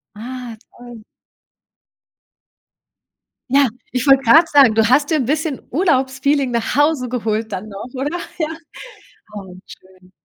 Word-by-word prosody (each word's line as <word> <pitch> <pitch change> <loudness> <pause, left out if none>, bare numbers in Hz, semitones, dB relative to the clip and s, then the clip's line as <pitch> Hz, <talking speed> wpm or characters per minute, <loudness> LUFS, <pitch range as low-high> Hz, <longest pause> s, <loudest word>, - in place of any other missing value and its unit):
Ah, 240 +1 -8
toll. 240 -2 -13 2.5
Ja, 275 +1 +4 0.2
ich 250 +3 -2
wollte 270 0 +5
grad 330 +3 +6
sagen, 270 -7 +5
du 225 0 +3
hast 285 +3 +3
dir 315 - +2
'n 265 - -1
bisschen 300 +1 -2
Urlaubsfeeling 270 -3 0
nach 235 0 -2
Hause 290 -3 +1
geholt 220 -2 -3
dann 195 +2 -6
noch, 205 +5 -9
oder? 285 +6 -3 0.2
Ja. 315 - 0 0.9
Oh, 190 -3 -9
schön. 185 0 -18
255 Hz, 130 wpm, -18 LUFS, 225-285 Hz, 2.5 s, grad